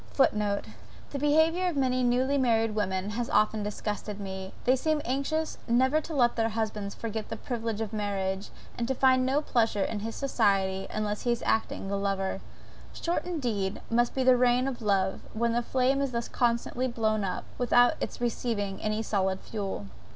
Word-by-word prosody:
(Footnote. 210 -6 +2 0.5
The 280 - -3
behaviour 320 +5 +3
of 340 -5 -1
many 255 -1 +2
newly 255 +3 +2
married 225 -3 +2
women 195 -1 -1
has 235 +2 -2
often 215 0 +2
disgusted 210 0 -4
me. 190 -1 -6
They 255 - +4
seem 310 +3 +1
anxious 280 +5 -1
never 260 +6 +3
to 315 0 -6
let 240 -3 +3
their 225 -1 +1
husbands 215 -2 -3
forget 220 -1 -4
the 225 - -4
privilege 225 -2 -3
of 220 -1 -4
marriage, 195 -2 -2 0.3
and 235 - 0
to 265 - 0
find 260 0 +4
no 285 +3 +1
pleasure 225 -6 +1
in 215 - -2
his 225 +2 -5
society 195 -7 +1
unless 210 -1 -2
he 240 - +1
is 235 - -1
acting 220 -3 0
the 200 0 -1
lover. 195 -1 -1 0.5
Short, 345 +1 -2
indeed, 235 - -2
must 240 +1 +2
be 265 - +1
the 255 -1 +6
reign 250 +1 +3
of 255 -3 -4
love, 195 -3 +1
when 235 +1 +1
the 240 - +2
flame 260 +3 +1
is 275 -3 -1
thus 235 0 -2
constantly 240 +1 0
blown 220 -3 0
up, 185 -2 -2 0.2
without 245 0 +5
its - - -4
receiving 225 -4 -2
any 215 +1 -1
solid 190 -3 0
fuel.) 200 - -4
230 Hz, 180 wpm, -28 LUFS, 205-255 Hz, 0.5 s, the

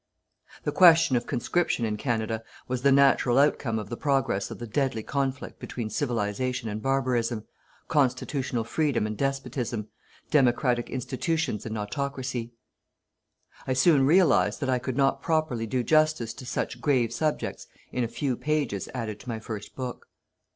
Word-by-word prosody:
The - - -1
question 165 -6 +6
of 120 - -1
conscription 130 0 0
in 105 -1 -1
Canada 110 -1 -2 0.2
was 125 -1 -2
the 140 +1 +4
natural 135 -2 +4
outcome 135 -5 +2
of 105 - -5
the 120 - -3
progress 135 -8 0
of - - -7
the 120 - -6
deadly 120 -1 -1
conflict 135 0 -3
between 110 -3 -5
Civilization 120 0 -1
and 105 +1 -4
barbarism, 120 -4 0 0.4
constitutional 130 -3 0
Freedom 140 -1 0
and 110 0 -3
despotism, 125 -4 -2 0.4
democratic 125 -3 +2
institutions 130 - -2
and 110 0 -4
autocracy. 130 +1 -3 1.2
I 130 - +1
soon 135 +2 +4
realized 170 -1 +4
that 130 -2 0
I 125 - +2
could 130 +1 -4
not 135 -1 +2
properly 155 -9 0
do 125 +2 0
justice 155 -5 +2
to 130 - -10
such 120 - -3
grave 120 -4 +2
subjects 155 +4 -2 0.2
in 125 - -1
a - - 0
few 130 +2 -2
pages 145 -9 -1
added 110 -4 -4
to 125 - -10
my 115 - -2
first 110 -2 -7
book. 125 -2 -6
125 Hz, 150 wpm, -27 LUFS, 115-140 Hz, 1.2 s, question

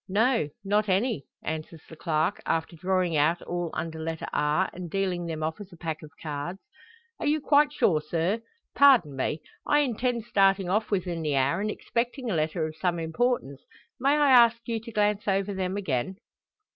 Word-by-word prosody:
"No, 225 - +2
not 210 +1 +1
any," 195 - 0 0.2
answers 160 0 -5
the 160 - -11
clerk, 160 +4 0
after 165 +1 -1
drawing 180 0 0
out 155 +4 +3
all 175 -1 -3
under 160 0 -4
letter 160 0 -4
R, 150 +6 +2
and 175 -1 -7
dealing 180 -2 -1
them 160 -1 -4
off 160 +5 -3
as 200 -1 -10
a 175 - -13
pack 160 -2 -4
of 155 - -10
cards. 155 +4 -4 0.6
"Are - - -2
you 305 +1 +2
quite 290 0 +4
sure, 160 - +2
sir? 170 +8 -1 0.3
Pardon 255 - +5
me. 150 +3 -2 0.2
I 295 0 +4
intend 245 -3 -1
starting 195 -4 +3
off 210 +4 0
within 180 -4 -1
the 150 -3 0
hour, 140 +7 +2
and 215 - -1
expecting 240 +2 -2
a - - 0
letter 155 +1 0
of 155 0 -7
some 175 +2 0
importance, 160 - -1 0.4
may 275 +4 +3
I 290 -2 +4
ask 235 -2 +7
you 230 -1 -1
to 230 +1 -10
glance 210 -1 +1
over 195 0 +1
them 190 0 -2
again?" 155 -2 -2
185 Hz, 185 wpm, -27 LUFS, 160-220 Hz, 0.6 s, ask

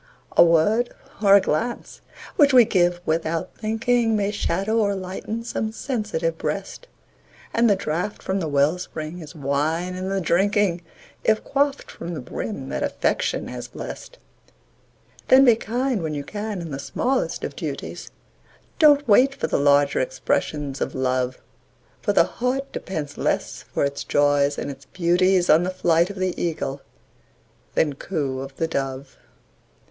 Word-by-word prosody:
A - - +8
word 175 +9 +3 0.3
or 200 -2 +7
a 200 - +7
glance 225 +8 -2 0.3
which 285 -2 +5
we 245 -2 +8
give 175 -4 +2
"without 160 0 -1
thinking", 225 +1 +1
May 205 -1 0
shadow 205 +2 -1
or 200 -2 +1
lighten 190 +4 -5
some 220 -1 -3
sensitive 210 -10 -2
breast; 195 - -4 0.7
And 235 0 +4
the 200 - +5
draught 180 +3 -3
from 190 +1 -1
the 165 - -2
well 145 +4 +2
spring 160 -1 -6
is 160 0 -10
wine 155 +5 -1
in 185 +1 -4
the 195 0 0
drinking, 190 +1 +2 0.4
If 220 0 +2
quaffed 280 0 0
from 170 0 -6
the - - -4
brim 135 - -5
that - - -3
Affection - - -1
has - - -6
blest. - - -8 1.1
Then 265 +1 +7
be 240 -3 +7
kind 240 0 -1
when 155 -2 -3
you 145 - -3
can 205 +3 -5
in 165 -2 -7
the 135 - -4
smallest 245 - -1
of - - -4
duties, - - -6 0.7
Don't 290 -3 +6
wait 255 +6 +5
for - - -2
the - - 0
larger 145 0 +4
expressions 140 +2 -2
of - - -2
Love; 130 -1 0 0.6
For - - +1
the - - +5
heart 260 +3 -2
depends 150 -6 -5
less - - -1
for - - -2
its 140 0 -3
joys 145 0 +2
and 145 - -3
its 135 0 -12
beauties 180 +1 +2
On 155 +2 +6
the 180 - -1
flight 170 -1 +2
of 200 - -7
the 185 -1 0
Eagle 150 -5 -2 0.9
than 150 -3 +2
coo 140 -3 -3
of 135 0 -7
the 165 - -1
Dove. 135 -3 -4
180 Hz, 160 wpm, -23 LUFS, 150-215 Hz, 1.1 s, A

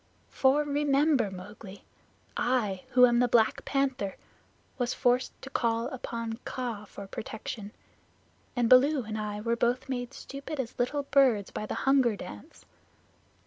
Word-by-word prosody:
For, 275 +3 +3
remember, 285 -3 +2
Mowgli, 190 +1 -10 0.5
I, 215 -7 0
who 250 0 +8
am 240 -1 +3
the 245 - +4
Black 225 -2 +3
Panther, 265 -8 -1 0.6
was 245 0 0
forced 250 0 +1
to 270 - -7
call 230 0 0
upon 230 -3 -5
Kaa 235 -5 -4
for 200 - -9
protection, 215 -1 -6 0.8
and 245 -2 +2
Baloo 260 +3 +5
and 215 0 -5
I 210 -1 -3
were 230 +2 0
both 240 +2 0
made 245 0 -4
stupid 275 +2 -7
as 240 -3 -4
little 285 +4 0
birds 260 -8 +3
by 215 - -4
the - - -3
Hunger 265 -5 +4
Dance. 105 - -11
245 Hz, 145 wpm, -29 LUFS, 215-270 Hz, 0.8 s, who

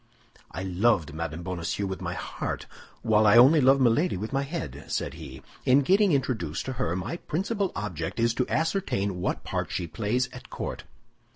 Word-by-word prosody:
"I 95 - -5
loved 95 -4 +1
Madame 80 +1 -4
Bonacieux 90 +2 -3
with 95 0 -4
my - - -3
heart, - - -4 0.4
while 110 -1 +4
I 105 - +7
only 140 +6 +7
love 135 +1 +5
Milady 130 - +3
with 110 +7 -5
my 135 - +2
head," 110 - -5
said - - -2
he. - - -10 0.2
"In 130 +2 +5
getting 195 +6 +4
introduced 110 - -1
to 130 - -3
her, 85 - 0
my 95 - -3
principal 195 +4 -2
object 90 -3 -4
is 115 0 +3
to 125 - -1
ascertain 130 - 0
what - - -2
part - - -3
she 90 - -2
plays 110 +8 -1
at - - -11
court." - - -5
115 Hz, 180 wpm, -27 LUFS, 90-140 Hz, 0.4 s, I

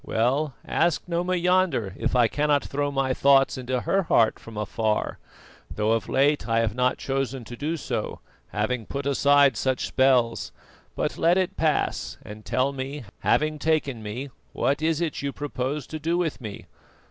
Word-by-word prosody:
Well, 130 +5 0
ask 170 -1 +1
Noma 175 +1 0
yonder 180 - +1
if - - -1
I 120 -2 +5
cannot 145 +2 +1
throw 145 +1 -2
my 135 -2 0
thoughts 135 0 +4
into 130 -1 -2
her 195 - +1
heart 115 - +3
from 115 -2 -11
afar: 105 +1 -1 0.5
though 105 +1 0
of 115 -1 0
late 145 +1 +2
I 115 0 +3
have 110 -2 0
not 125 +2 +1
chosen 135 -1 -2
to 120 +2 -9
do 155 +6 -2
so, - - -4 0.3
having 110 +2 -2
put 140 0 -4
aside 140 -1 +4
such 130 +4 0
spells. 125 -3 +2 0.4
But - - -2
let 170 +2 +4
it 185 -1 0
pass, 155 -3 0
and 105 +1 -9
tell 130 +5 +1
me, 135 +1 -5 0.2
having 155 0 +1
taken 145 -6 0
me, 120 +6 -6 0.2
what 140 +2 0
is 160 0 +1
it 165 -3 -2
you 140 0 -2
propose 145 0 -3
to 155 - -6
do 165 +3 0
with 165 -6 -2
me? 105 -4 -7
135 Hz, 170 wpm, -25 LUFS, 120-150 Hz, 0.5 s, I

